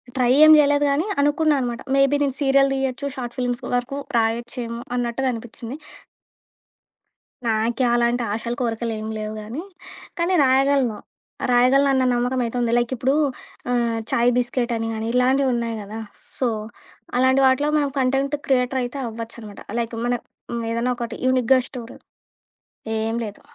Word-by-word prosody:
Try 250 -2 +2
ఏం 310 - +9
జేయలేదు 290 0 +4
గానీ, 300 +8 +1
అనుకున్నా 295 +1 +2
అనమాట. 240 -1 -3
మేబీ 275 +1 +4
నేను 275 -2 -1
సీరియల్ 275 0 +4
దీయొచ్చు 270 +1 -2
షార్ట్ 240 -3 -6
ఫిల్మ్స్ 245 -1 -2
వరకు 245 +3 -2 0.2
రాయొచ్చేమో 235 +1 -1 0.2
అన్నట్టుగా 245 +2 -1
అనిపించింది. 235 +2 -7 1.7
నాకే 225 +3 +1
అలాంటి 240 0 +1
ఆశలు 235 +2 -3
కోరికలేం 225 -2 -2
లేవు 215 0 -4
గానీ, 230 +9 -6 0.6
కానీ 340 +2 +1
రాయగలను. 265 -3 +3 0.5
రాయగలనన్న 260 +2 +4
నమ్మకం 245 +2 0
అయితే 230 - -5
ఉంది. 235 -1 +1
లైక్ 240 0 0
ఇప్పుడు 260 +3 +1 0.6
ఆహ్, 235 -2 +1
చాయ్ 240 +1 +3
బిస్కెట్ 240 0 0
అని 225 0 -2
గాని, 220 0 -4
ఇలాంటివున్నాయి 250 -2 +2
గదా! 210 +2 -7 0.4
సో, 250 -3 +2 0.7
అలాంటి 260 +1 +4
వాటిలో 265 +3 +3
మనం 285 -2 0
కంటెంట్ 270 +2 +1
క్రియేటర్ 260 0 +1
అయితే 245 +3 -5
అవ్వొచ్చనమాట. 225 -2 -7 0.2
లైక్ 230 0 -3
మన 245 - +1 0.6
ఏదైనా 235 +2 0
ఒకటి 235 -1 -5
యూనిక్‍గా 255 0 +4
స్టోరీ 240 -2 -9 1.0
ఏం 225 +1 -1
లేదు. 205 -1 -8
245 Hz, 135 wpm, -22 LUFS, 235-270 Hz, 1.7 s, ఏం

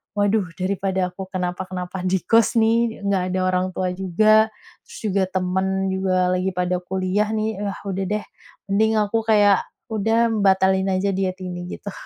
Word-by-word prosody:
"Waduh 205 -1 +1
daripada 190 -1 -1
aku 190 +1 -8
kenapa-kenapa 180 0 -4
di 185 0 0
kos 230 +2 +3
nih, 230 -1 +2
enggak 190 -2 0
ada - - +1
orang 185 0 +1
tua 185 -1 -1
juga, 215 +4 +3 0.4
terus - - -11
juga 195 0 +2
temen 190 +1 -1
juga 185 -1 +1
lagi 185 +1 0
pada 180 0 0
kuliah 190 +3 -1
nih, 215 -1 -2
ah, 200 - -3
udah 195 0 -2
deh 210 +1 -2 0.5
mending 220 +2 +3
aku 210 +2 +1
kayak, 205 -3 +4 0.3
udah, 225 +2 +2
mmm, 220 -2 -1
batalin 190 0 +3
aja 195 +1 0
diet 185 0 -1
ini." 175 -1 -6
Gitu. 205 - -7
190 Hz, 165 wpm, -22 LUFS, 185-210 Hz, 0.5 s, kayak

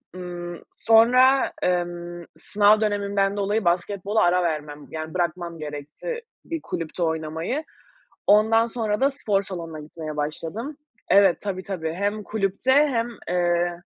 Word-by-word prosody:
Imm, 175 -1 -6 0.2
sonra, 250 +4 +5
emm, 175 -1 -2
sınav 210 +1 +3
dönemimden 200 -1 0
dolayı 205 +1 0
basketbola 200 +4 +1
ara 180 +1 +3
vermem, 150 -3 -3
yani, 155 0 -5
bırakmam 175 -1 -2
gerekti 150 - -6 0.2
bir 330 -2 -4
kulüpte 165 - -4
oynamayı. 160 - -2 0.6
Ondan 220 +2 +5
sonra 225 -2 -2
da 275 +1 +4
spor 210 -8 0
salonuna 165 -5 -7
gitmeye 155 0 -7
başladım 165 - -4 0.3
Evet, 195 -3 +5
tabii, 190 -2 -4
tabii, 165 -5 -4
hem 205 +4 -2
kulüpte 205 +5 0
hem, 265 -5 +3 0.2
eee 175 0 +1
185 Hz, 125 wpm, -24 LUFS, 170-215 Hz, 0.6 s, sonra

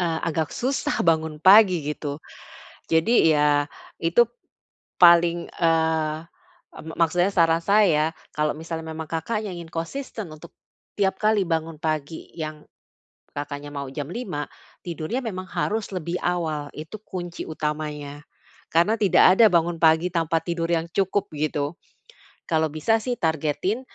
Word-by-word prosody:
eee, 165 -2 0
agak 160 -2 -1
susah 265 +3 -1
bangun 160 -2 +1
pagi, 185 -1 +6
gitu. 145 -1 -4 0.8
Jadi, 160 +1 +4
ya 150 -1 +3 0.4
itu 205 +8 +4 0.7
paling, 170 0 +6
eee, 160 -2 +1 0.6
e - - -12
me 160 - -7
maksudnya 175 +4 +2
saran 165 -2 +3
saya, 170 -7 +3 0.2
kalau 150 0 -1
misalnya 160 0 -6
memang 160 -1 -7
Kakaknya 210 +6 -2
ingin 170 -2 -8
konsisten 215 +3 -5
untuk 155 +2 -12 0.4
tiap 190 -2 0
kali 215 -1 +2
bangun 165 -3 -2
pagi, 155 -1 -3
yang 155 -1 -5 0.7
Kakaknya 145 0 -6
mau 140 -1 -5
jam 145 +3 -6
05:00, 180 -10 -4 0.4
tidurnya 175 - -4
memang 185 -5 -5
harus 205 +3 -2
lebih 175 0 -3
awal, 160 -4 -2
itu 160 +8 -8
kunci 175 -4 -6
utamanya. 150 -2 -4 0.5
Karena 205 +8 +2
tidak 190 -1 +5
ada 230 - +9
bangun 170 0 +2
pagi 160 +2 +4
tanpa 165 -1 0
tidur 170 -1 -2
yang 170 0 -1
cukup, 195 +1 0
gitu. 150 0 -2 0.7
Kalau 160 -2 +1
bisa 155 +10 +1
sih 245 +1 -3
targetin 160 - -1
165 Hz, 135 wpm, -24 LUFS, 155-185 Hz, 0.8 s, ada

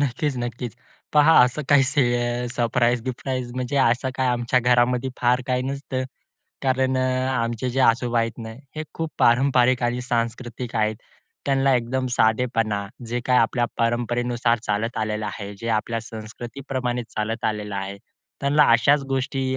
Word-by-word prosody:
नक्कीचं, 135 0 -1
नक्कीचं. 120 -1 -5 0.4
पहा 150 +1 +6
असं 125 +5 -2
काही 145 -2 +6
से 120 -3 0
सरप्राईज-बिप्राईज, 120 +1 -1
म्हणजे 130 +2 -2
असं 130 0 +2
काय 130 - +1
आमच्या 120 0 +1
घरामध्ये 125 +1 +2
फार 125 +1 +3
काही 125 -1 0
नसतं. 135 -1 -3 0.6
कारण 130 -1 +1
अ, - - +1 0.3
आमचे 115 +1 -1
जे 135 +2 -1
आजोबा 120 -1 +3
आहेत 115 +1 -1
ना, 110 -1 -7 0.2
हे 155 - -2
खूप 160 -1 -3
पारंपरिक 125 0 +4
आणि 120 +1 0
सांस्कृतिक 120 0 -3
आहेत. 110 0 +1 0.5
त्यांना 135 -1 +3
एकदम 125 +2 -1
साधेपणा, 110 -2 +1 0.2
जे 120 +2 -2
काही 125 -1 +4
आपल्या 120 +1 +2
परंपरेनुसार 120 0 +1
चालत 105 +3 -1
आलेलं 110 -1 -2
आहे, 100 -1 -6
जे 115 - -4
आपल्या 115 +2 -3
संस्कृतीप्रमाणे 120 +3 -5
चालत 110 +2 -3
आलेलं 105 -1 -2
आहे, 95 0 -4 0.4
त्यांना 145 +2 +4
अशाचं 140 +4 +4
गोष्टी 135 0 -1
120 Hz, 145 wpm, -23 LUFS, 115-130 Hz, 0.6 s, पहा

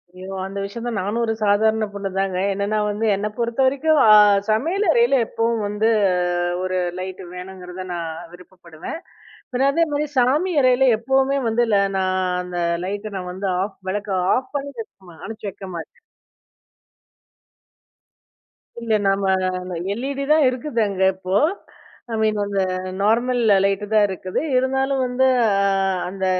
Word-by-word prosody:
ஐயோ! 185 +1 -9
அந்த 195 +1 -7
விஷயம் 230 +4 -6
தான் 235 -3 -2
நானும் 205 +5 -2
ஒரு 225 - 0
சாதாரண 220 +2 +2
பொண்ணு 200 -1 -4
தாங்க. 195 -1 0 0.2
என்னென்னா 200 +2 -1
வந்து, 210 +2 -2
என்னை 205 +2 -2
பொறுத்த 235 +1 -2
வரைக்கும் 285 +4 +2
அ - - +6 0.4
சமையல் 330 - +1
அறையில 240 +1 +3
எப்பவும் 230 -1 -1
வந்து 210 +2 0 0.7
ஒரு 185 0 -1 0.2
லைட் 185 +1 -6
வேணுங்கிறத 180 0 -8
நான் 170 -2 -4 0.2
விருப்பப்படுவேன். 175 - -10 0.6
பின்ன 265 +2 +2
அதேமாரி 300 -2 0
சாமி 290 +9 +2
அறையில 255 0 +4
எப்பவுமே 265 +4 +1
வந்து 235 +2 +2
ல - - +5 0.2
நான் 185 0 0 0.2
அந்த 180 -1 -5 0.3
லைட்ட 205 +2 -5
நான் 180 -1 -5
வந்து 195 +2 -4
ஆஃப் 195 0 -4
விளக்க 205 +1 -3 0.2
ஆஃப் 260 +1 -4
பண்ணி 280 0 -5
வெக்க 225 - -7 0.2
மா 170 - -14
அணைச்சு 215 -2 -6
வைக்க 195 - -10
மாட்டேன். 320 - -9 2.8
இந்த 225 -2 +1
நம்ம 185 -2 0 0.2
எல்இடி 275 +5 -3
தான் 310 -3 +4
இருக்குது 250 0 -3
அங்க 190 -1 -1
இப்போ. 185 0 -3 0.8
ஐ - - 0
மீன் 215 -1 +1
அந்த 200 -1 -1 0.4
நார்மல் 240 +4 +2 0.2
லைட் 195 +1 0
தான் 215 -1 +5
இருக்குது. 185 -1 -4 0.2
இருந்தாலும் 265 +1 +1
வந்து, 250 +1 +1 0.2
ஆ - - +3 0.6
அந்த 190 0 -4
215 Hz, 145 wpm, -21 LUFS, 190-255 Hz, 2.8 s, அ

